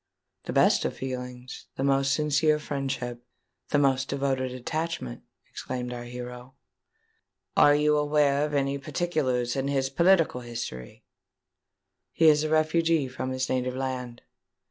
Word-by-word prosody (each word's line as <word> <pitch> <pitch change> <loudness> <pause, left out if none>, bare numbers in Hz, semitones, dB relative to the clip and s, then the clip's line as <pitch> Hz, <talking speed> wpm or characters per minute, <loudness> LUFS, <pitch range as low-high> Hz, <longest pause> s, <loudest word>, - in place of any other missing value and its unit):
"The - - -3
best - - +4
feelings—the 125 0 -5
most 135 0 +2
sincere 150 +1 +2
friendship—the 130 -2 -5
most 135 -2 +2
devoted 135 -2 -1
attachment," 140 - -4 0.3
exclaimed 125 -1 -5
our 120 0 -6
hero. 125 +1 -8 1.0
"Are 145 0 +6
you 150 0 +3
aware 145 -1 +2
of 150 -1 -2
any 140 0 0
particulars 140 -5 -1
in 135 0 -1
his 135 -1 0
political 170 -4 +3
history?" 115 - -7 1.1
"He 165 - +4
is 150 0 +4
a 155 - -1
refugee 155 -1 +2
from 130 0 -4
his 130 0 -2
native 125 0 -1
land." 130 -2 -4
135 Hz, 120 wpm, -27 LUFS, 125-150 Hz, 1.1 s, Are